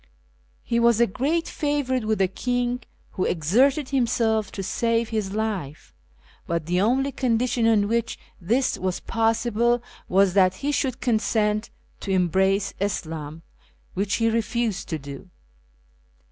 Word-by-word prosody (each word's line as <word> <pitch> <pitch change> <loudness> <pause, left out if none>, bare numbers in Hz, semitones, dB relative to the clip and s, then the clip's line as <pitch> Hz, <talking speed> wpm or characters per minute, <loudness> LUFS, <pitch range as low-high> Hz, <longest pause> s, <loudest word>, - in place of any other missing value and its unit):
He 235 - 0
was 235 -1 +4
a 235 - +6
great 285 - -1
favourite 285 -5 -1
with 215 0 +1
the 190 - +3
king, 245 +5 -1 0.3
wlio 185 - 0
exerted 255 - +2
liiinself 230 -5 +1
to 195 - -4
save 230 +3 0
his 215 -4 -2
life, 205 -10 -4 0.5
hut 170 -2 -1
the 180 +2 +1
only 265 +6 +2
condition 240 -2 +1
on 210 -3 +3
which 230 +1 -1 0.2
this 240 +9 +1
was 185 -1 -2
possihle 230 +1 +1 0.3
was 195 -1 +4
that 185 -1 +4
he 285 +7 -2
shouUl 265 -4 -1
consent 215 -2 0 0.3
to - - -7
embrace 190 +2 +2
Ishim, 160 -5 -4 0.5
which 195 +1 0
he 225 - +1
refused 230 -1 -1
to 160 - -1
do. 140 +5 -10
220 Hz, 135 wpm, -24 LUFS, 190-240 Hz, 0.5 s, a